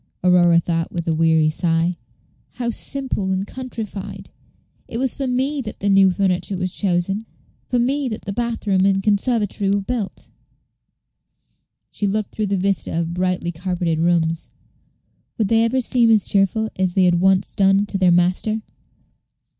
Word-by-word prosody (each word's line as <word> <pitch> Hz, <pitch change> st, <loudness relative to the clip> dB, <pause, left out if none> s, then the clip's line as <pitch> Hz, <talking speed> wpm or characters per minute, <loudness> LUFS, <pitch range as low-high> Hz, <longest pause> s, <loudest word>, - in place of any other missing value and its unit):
Aurora 175 Hz, -2 st, +5 dB
thought, 165 Hz, 0 st, -2 dB
with 170 Hz, -1 st, -4 dB
a 165 Hz, -, +2 dB
weary 160 Hz, -1 st, +3 dB
sigh; 165 Hz, +1 st, 0 dB, 0.6 s
"how 240 Hz, -1 st, -2 dB
simple 260 Hz, -6 st, -2 dB
and 190 Hz, +1 st, -1 dB
countrified! 205 Hz, -6 st, -7 dB, 0.6 s
It 230 Hz, -, -5 dB
was 260 Hz, 0 st, 0 dB
for 275 Hz, -2 st, -3 dB
me 265 Hz, +3 st, -1 dB
that 215 Hz, -4 st, -8 dB
the 200 Hz, -, 0 dB
new 195 Hz, -1 st, +5 dB
furniture 190 Hz, 0 st, 0 dB
was 185 Hz, 0 st, -2 dB
chosen, 195 Hz, +3 st, -1 dB, 0.4 s
for 250 Hz, -, 0 dB
me 265 Hz, +3 st, 0 dB
that 215 Hz, -, -6 dB
the 200 Hz, -, -3 dB
bath 235 Hz, +1 st, -3 dB
room 190 Hz, -2 st, +2 dB
and 195 Hz, 0 st, +2 dB
conservatory 205 Hz, -1 st, +1 dB
were 200 Hz, 0 st, +1 dB
built." 215 Hz, -1 st, -5 dB, 1.6 s
She 205 Hz, -, -2 dB
looked 210 Hz, +1 st, -2 dB
through 215 Hz, -1 st, -2 dB
the 195 Hz, 0 st, 0 dB
vista 190 Hz, -3 st, -1 dB
of 170 Hz, 0 st, -2 dB
brightly 180 Hz, -1 st, -1 dB
carpeted 175 Hz, -1 st, -2 dB
rooms. 165 Hz, -1 st, 0 dB, 0.9 s
Would 215 Hz, -3 st, 0 dB
they 225 Hz, 0 st, +4 dB
ever 240 Hz, +3 st, +1 dB
seem 240 Hz, -1 st, +3 dB
as 215 Hz, -3 st, +4 dB
cheerful 205 Hz, +3 st, +1 dB
as 185 Hz, -2 st, 0 dB
they 190 Hz, -, +4 dB
had 175 Hz, -1 st, +3 dB
once 190 Hz, 0 st, +2 dB
done 195 Hz, +1 st, +3 dB
to 200 Hz, -, -3 dB
their 185 Hz, -1 st, +4 dB
master? 180 Hz, +5 st, +2 dB
195 Hz, 160 wpm, -20 LUFS, 180-220 Hz, 1.6 s, Aurora